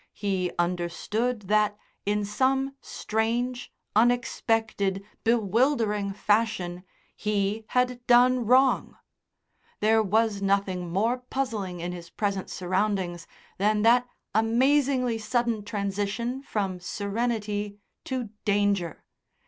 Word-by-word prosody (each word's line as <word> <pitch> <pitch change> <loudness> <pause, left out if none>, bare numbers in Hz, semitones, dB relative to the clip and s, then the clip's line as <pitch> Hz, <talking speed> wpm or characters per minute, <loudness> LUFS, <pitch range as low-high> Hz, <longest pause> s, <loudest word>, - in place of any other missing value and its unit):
He 190 -3 -1
understood 180 +7 -1
that, 210 +1 +2 0.3
in 210 0 +1
some 265 +5 +1
strange, 235 +3 -2 0.2
unexpected, 225 -4 +1 0.2
bewildering 225 -2 +2
fashion 205 -4 0 0.3
he 210 +1 -1
had 250 -1 0
done 250 +1 +5
wrong. 260 +2 +3 0.8
There 220 +1 +4
was 215 0 +1
nothing 195 -3 0
more 225 +7 +1
puzzling 225 -9 -3
in 175 +1 -3
his 170 -1 -8
present 200 0 -2
surroundings 185 -2 -1 0.3
than 210 +1 +2
that 240 +2 +5 0.3
amazingly 250 +2 +2
sudden 235 -1 0
transition 205 +5 -2
from 195 -8 -2
serenity 205 +1 -2 0.3
to 255 -4 -3
danger. 200 -5 +1
215 Hz, 95 wpm, -27 LUFS, 200-240 Hz, 0.8 s, done